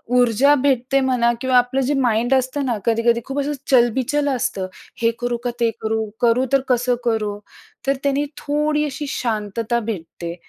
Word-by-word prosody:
ऊर्जा 250 +3 +4
भेटते 270 0 +2
म्हणा 250 -3 +2
किंवा 260 -1 +3
आपलं 245 +2 +2
जे 265 +3 0
माइंड 240 +1 +2
असतं 265 +2 0
ना, 240 -4 0
कधी-कधी 235 +1 +2
खूप 270 +1 -3
असं 285 +1 -1 0.2
चलबिचल 260 +4 +2
असतं, 250 -7 -1 0.3
हे 230 0 +3
करू 245 -1 -1
का 245 - 0
ते 235 -1 +3
करू? 220 0 -1 0.2
करू 240 +2 +3
तर 275 - +5
कसं 245 0 +2
करू? 215 -3 0 0.5
तर 275 - +3
त्याने 280 +1 +1
थोडी 300 +1 0
अशी 295 +1 -5
शांतता 225 -1 -2
भेटते 170 -3 -5
245 Hz, 165 wpm, -21 LUFS, 230-270 Hz, 0.5 s, तर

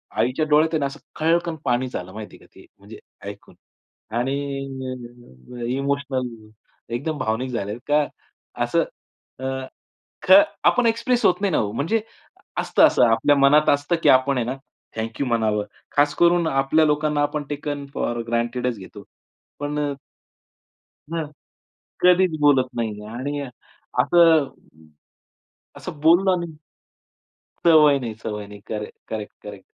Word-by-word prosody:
आईच्या 125 +7 +1
डोळ्यात 155 +2 +4
आहे 155 - +2
ना 140 - 0
असं 135 - -6 0.2
खळकन 165 +1 +1
पाणीच 125 0 0
आलं 90 +1 -6
माहिती 105 0 -9
आहे - - -18
का - - -21
ते - - -15
म्हणजे - - -12 0.3
ऐकून. - - -12 0.6
आणि 130 +3 0 1.2
अ, - - -3
इमोशनल 140 -2 -1 0.7
एकदम 150 +5 -3
भावनिक 115 +4 -2
झाले 105 -3 -3
का 150 0 +3 0.6
असं - - +1 0.6
अ, 130 - -4 0.8
ख - - +2 0.3
आपण 245 - +4
एक्सप्रेस 235 +2 +1
होत 180 +1 +3
नाही 200 -2 +1
ना - - +2
हो. 105 -1 0
म्हणजे 210 - 0 0.6
असतं - - +2
असं - - +2
आपल्या 115 +5 +3
मनात 140 +2 +5
असतं 145 +4 +2
की - - +5
आपण 130 +1 +4
आहे 120 - 0
ना 130 - -3 0.4
थँक 110 0 -5
यू - - +1
म्हणावं. 110 -4 +1 0.3
खास 145 +1 +3
करून 175 -1 +3
आपल्या 135 +2 +2
लोकांना 150 0 +1
आपण 145 0 -1
टेकन 145 -1 -4
फॉर 120 0 -2
ग्रँटेडच 120 +1 -1
घेतो. 100 +1 -11 0.6
पण 145 +1 -3
अ 145 -1 -1 1.2
हं. 165 -2 -1 0.8
कधीच 180 -2 +4
बोलत 140 -3 +4
नाहीये 110 -3 -3
आणि 145 +3 -3 0.6
असं, 160 +1 +5 1.3
असं 150 - -8
बोलला 175 +4 +5
ना 170 - -3 1.2
सवय 150 -4 +6
नाही, 115 -4 -5
सवय 105 -2 -5
नाही. 105 0 -12
Correct, 105 -1 -5
correct, 110 -2 -5
correct. 100 -2 -10
140 Hz, 140 wpm, -22 LUFS, 120-155 Hz, 1.3 s, सवय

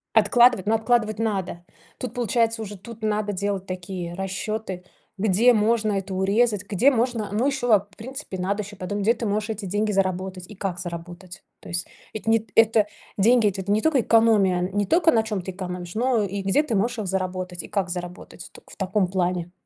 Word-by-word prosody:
Откладывать? 240 -5 +5
Ну, 225 - +3
откладывать 220 -1 +1
надо. 190 -5 -2 0.3
Тут 250 -3 -5
получается 230 -2 0
уже, 205 -1 -7
тут 230 +4 -11
надо 210 -1 -1
делать 195 0 -2
такие 180 -2 -5
расчеты, 195 0 -4 0.3
где 220 +5 +4
можно 215 -1 +2
это 195 0 -3
урезать, 205 +2 +2
где 235 +8 +4
можно, 230 -4 -1
но 230 +6 +1
еще 265 -3 -1
вап 205 -2 +3
в - - -19
принципе, 260 -4 -7
надо 200 +3 -1
еще 205 +1 -10
потом, 205 +2 -4
где 220 +4 +4
ты 235 - -5
можешь 210 +1 -1
эти 215 -2 -4
деньги 210 +3 0
заработать 185 -1 -1
и 210 - -11
как 185 -2 -3
заработать. 175 +1 -8 0.2
То - - -12
есть, 175 0 -2 0.3
это 220 +1 -4
не 225 - +5
т 220 -1 -17
это 225 -2 +5 0.3
деньги- 225 +2 +4
это 195 -1 -1
ведь 195 - -8
не 210 +1 +3
только 305 -5 +3
экономия, 215 -6 +4
не 200 +3 -1
только 325 - +4
на 225 -1 +3
чем 210 -4 -3
ты 190 - -6
экономишь, 180 -1 -6
но 240 -2 +2
и 200 0 -3
где 195 +10 +3
ты 265 -7 -2
можешь 230 +4 0
их 200 - -3
заработать 185 -1 -3
и - - -9
как 195 -3 -1
заработать. 175 +1 -7
Только - - -16
в - - -13
таком 190 0 +1
плане. 180 -2 -1
205 Hz, 205 wpm, -24 LUFS, 185-225 Hz, 0.3 s, Откладывать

